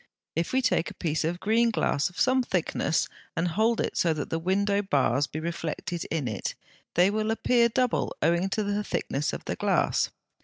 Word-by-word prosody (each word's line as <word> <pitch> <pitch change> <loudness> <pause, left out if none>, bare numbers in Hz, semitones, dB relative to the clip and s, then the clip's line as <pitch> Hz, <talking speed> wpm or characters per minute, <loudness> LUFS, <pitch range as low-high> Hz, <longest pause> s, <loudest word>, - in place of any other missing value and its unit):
If 165 +1 -1
we 260 0 +2
take 175 - +2
a - - -11
piece 160 -1 -1
of 170 +3 -1
green 230 +4 +3
glass 145 -9 +1
of 180 - -11
some 260 0 +4
thickness, 180 -7 0 0.3
and 175 +2 +1
hold 220 +6 +2
it - - -1
so 165 -2 +2
that 150 - -4
the 165 - 0
window 200 +3 +1
bars 140 - +1
be 155 - -5
reflected 165 +1 -4
in 155 -6 -1
it, 105 -4 -3 0.4
they 180 +3 +5
will 215 +1 -1
appear 235 +1 +3
double 250 +1 0
owing 170 +4 +2
to 215 +2 0
the 205 +1 -1
thickness 150 -7 -2
of - - -6
the - - -2
glass. - - +1
180 Hz, 195 wpm, -27 LUFS, 160-215 Hz, 0.4 s, they